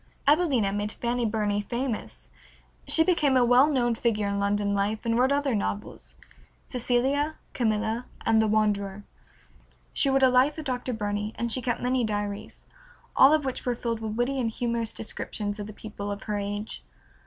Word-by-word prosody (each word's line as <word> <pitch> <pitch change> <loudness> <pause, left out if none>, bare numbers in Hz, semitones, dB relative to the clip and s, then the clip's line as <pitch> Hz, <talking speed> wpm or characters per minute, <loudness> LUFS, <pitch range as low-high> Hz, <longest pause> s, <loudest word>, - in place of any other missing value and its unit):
"Evelina" 280 - +3
made 205 +1 -2
Fanny 240 0 -1
Burney 210 -1 0
famous. 235 +2 -4 0.6
She 320 - +6
became 305 -7 +3
a 245 - +5
well 250 +4 +6
known 245 -5 +2
figure 225 -3 0
in 200 0 -1
London 200 0 +1
life, 205 +2 0
and 230 0 +1
wrote 255 +3 +3
other 285 -2 +1
novels, 205 0 -4 0.5
"Cecilia, 265 +5 0 0.2
"Camilla," 220 0 -1 0.2
and 220 -1 +4
"The 220 - +2
Wanderer." 205 -2 0 0.9
She 275 - +2
wrote 270 0 +3
a 260 - +7
life 255 +5 +3
of 315 - -6
Dr. 255 -1 -2
Burney, 210 0 -3
and 235 0 -2
she 255 - 0
kept 240 -1 -2
many 250 0 +1
diaries, 205 0 -4 0.5
all 270 - +7
of 305 -2 +2
which 260 - -3
were 245 -1 0
filled 230 -1 -3
with 220 -1 -4
witty 255 +3 0
and 235 -3 0
humorous 235 0 -1
descriptions 210 -1 -4
of 205 - -5
the - - -7
people 205 -1 -7
of 200 - -6
her 210 -1 -2
age. 205 +2 -5
230 Hz, 175 wpm, -27 LUFS, 210-255 Hz, 0.9 s, a